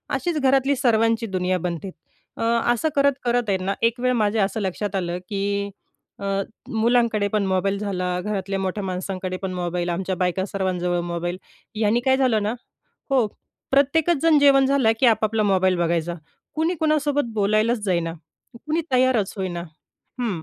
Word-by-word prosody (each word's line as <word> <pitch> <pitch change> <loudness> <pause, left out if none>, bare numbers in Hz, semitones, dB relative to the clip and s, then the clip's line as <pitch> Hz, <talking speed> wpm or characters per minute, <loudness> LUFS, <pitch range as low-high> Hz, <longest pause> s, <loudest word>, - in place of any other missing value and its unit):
अशीच 345 -3 -1
घरातली 270 +1 +3
सर्वांची 230 -2 +2
दुनिया 185 -1 0
बनते. 175 +2 -4 0.5
अ, - - -6 0.3
असं 310 +7 0
करत, 280 0 +4
करत 240 -2 0
आहेत 190 -1 +1
ना, 195 +2 -1
एक 230 +1 +1
माझ्या 220 -4 +2
असं 205 +3 -2
लक्षात 195 +1 -3
आलं, 175 -2 -1
की 200 0 -2 0.5
अ, 200 - -5 0.5
मुलांकडे 225 -2 +2
पण 205 -2 +1
मोबाईल 190 +1 0
झाला, 190 -3 -2 0.2
घरातल्या 195 -1 -3
मोठ्या 190 +2 -2
माणसांकडे 185 0 -4
पण 190 -1 -3
मोबाईल, 175 0 -2
आमच्या 185 +2 -2
बायका 185 +1 0
सर्वांजवळ 180 -2 -1
मोबाईल. 175 +1 -3 0.4
ह्यानी 220 +2 +2
काय 265 0 +4
झालं 235 -6 +2
ना 215 +3 0 0.6
हो, 255 -5 +3 0.4
प्रत्येकच 290 +5 +3
जण 320 -3 +5
जेवण 275 -1 +5
झालं 265 -5 +3
की 260 - +5
आपापला 220 -1 +2
मोबाईल 190 -2 +2
बघायचा. 170 0 0 0.4
कुणी 325 +3 0
कुणासोबत 290 -4 +1
बोलायलाच 215 +3 +2
जाईना, 170 -3 0 0.5
कुणी 315 +2 +1
तयारच 255 -6 +2
होईना. 180 -3 -3 0.6
हं, 195 -9 -2
205 Hz, 155 wpm, -23 LUFS, 185-245 Hz, 0.6 s, जण